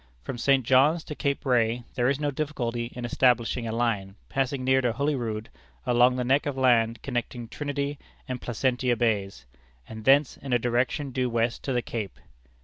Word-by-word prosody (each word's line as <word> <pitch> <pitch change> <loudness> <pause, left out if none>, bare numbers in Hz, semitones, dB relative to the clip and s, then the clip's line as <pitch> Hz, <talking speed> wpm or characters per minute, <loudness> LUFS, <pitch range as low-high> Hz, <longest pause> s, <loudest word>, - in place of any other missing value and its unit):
From 120 - -5
St. 135 -1 +3
John's 145 +7 +4
to - - -6
Cape 140 -1 -2
Ray 120 -2 +2
there 125 0 +1
is 140 0 0
no 145 -1 0
difficulty 120 -5 -3
in 120 -1 -4
establishing 120 -1 +2
a - - -2
line 110 -5 -1
passing 135 -1 -1
near 130 +1 +3
Holy 140 +5 0
Rood 115 -4 -3 0.4
along 125 0 +4
the 125 - -1
neck 135 +4 +2
of 140 -2 -3
land 115 -3 +2
connecting 120 -2 -4
Trinity 145 +2 -3 0.3
and 130 -1 -4
Placentia 125 +1 0
Bays, 105 -4 -1 0.4
and 110 -1 -9
thence 135 +3 +4
in 135 -3 -4
a - - +5
direction 125 +4 -1
due 125 0 0
west 115 0 0
to 135 - -1
the 120 -2 0
Cape. 105 -5 -5
125 Hz, 180 wpm, -26 LUFS, 115-135 Hz, 0.4 s, a